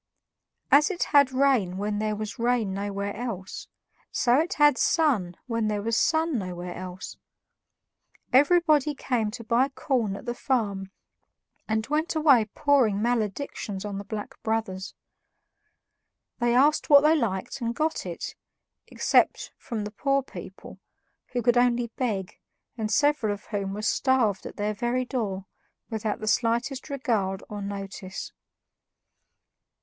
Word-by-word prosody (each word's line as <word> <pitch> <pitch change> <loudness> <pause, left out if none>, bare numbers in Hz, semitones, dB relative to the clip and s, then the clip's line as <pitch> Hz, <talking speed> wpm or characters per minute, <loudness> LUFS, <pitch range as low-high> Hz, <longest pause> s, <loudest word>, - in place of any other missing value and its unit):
As 295 +2 +6
it 370 -3 -1
had 280 -3 +4
rain 255 -9 +2
when 205 +1 -2
there 215 0 -1
was 215 +2 -6
rain 235 -4 +1
nowhere 200 0 -3
else, 210 -6 -6 0.4
so 245 +2 +3
it 340 +5 0
had 295 -3 +5
sun 225 - +2
when 230 -3 -1
there 210 -1 -1
was 230 +1 0
sun 320 0 +2
nowhere 180 -2 -5
else. 185 0 -8 1.2
Everybody 300 0 +4
came 235 -6 -1
to 230 +2 -8
buy 240 +4 +2
corn 245 -7 -1
at - - -9
the 240 - -2
farm 210 -8 -1 0.8
and 220 0 0
went 305 +4 -1
away 280 -8 +5
pouring 235 -3 +2
maledictions 215 -3 -2
on 200 -1 -4
the - - -6
Black 205 +1 -7
Brothers. 215 -4 -3 1.4
They 240 0 +2
asked 290 +4 +3
what 285 -1 +9
they 305 +2 +5
liked 220 -4 -2
and 235 0 -2
got 315 +3 -1
it, - - -6 0.5
except - - +2
from 225 -4 -5
the 210 - -5
poor 275 +5 0
people, - - -11 0.5
who 245 -1 -3
could 240 +1 +3
only 245 -1 +2
beg, 205 -8 -3 0.4
and 220 -3 -3
several 290 -5 +2
of 205 0 -6
whom 200 -2 -3
were 210 - -5
starved 240 -4 +1
at - - -10
their 210 0 -1
very 240 +3 -1
door 205 -7 -3 0.5
without 220 -1 -2
the 215 - -5
slightest 240 +6 0
regard 220 -9 -1
or 205 -1 -6
notice. 195 -1 -6
230 Hz, 140 wpm, -26 LUFS, 205-265 Hz, 1.4 s, what